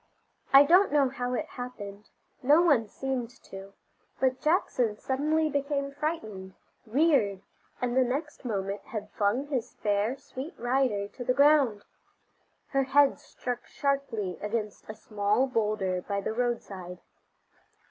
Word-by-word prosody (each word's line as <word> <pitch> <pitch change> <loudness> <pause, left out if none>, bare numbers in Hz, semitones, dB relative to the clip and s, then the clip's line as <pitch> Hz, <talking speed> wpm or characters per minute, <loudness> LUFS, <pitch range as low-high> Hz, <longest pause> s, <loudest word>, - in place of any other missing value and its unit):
I 275 +1 +9
don't 360 +7 +5
know 285 -3 +3
how 250 -1 -3
it 305 - -2
happened, 215 -7 -8 0.3
no 295 +6 +5
one 275 -10 +3
seemed 260 +1 -3
to, 195 0 -10 0.5
but 260 0 +1
Jackson 255 - +1
suddenly 305 +6 +1
became 280 -1 -1
frightened, 220 - -4 0.3
reared, 230 - +2 0.4
and 245 -1 -1
the 260 - +5
next 280 +5 -3
moment 200 -4 -3
had 210 -2 -6
flung 215 +6 0
his 270 -5 -3
fair, 210 +5 0
sweet 275 +2 -8
rider 245 -5 +1
to 245 - -8
the 250 +1 +1
ground. 280 -7 +4 0.8
Her 275 -1 +1
head 280 +1 +4
struck 245 -1 -6
sharply 265 - -2
against 210 0 -4
a 215 - -5
small 210 +3 +1
bowlder 210 -7 0
by 200 +2 -2
the 200 - -3
roadside. 205 -7 -3
250 Hz, 135 wpm, -28 LUFS, 210-280 Hz, 0.8 s, I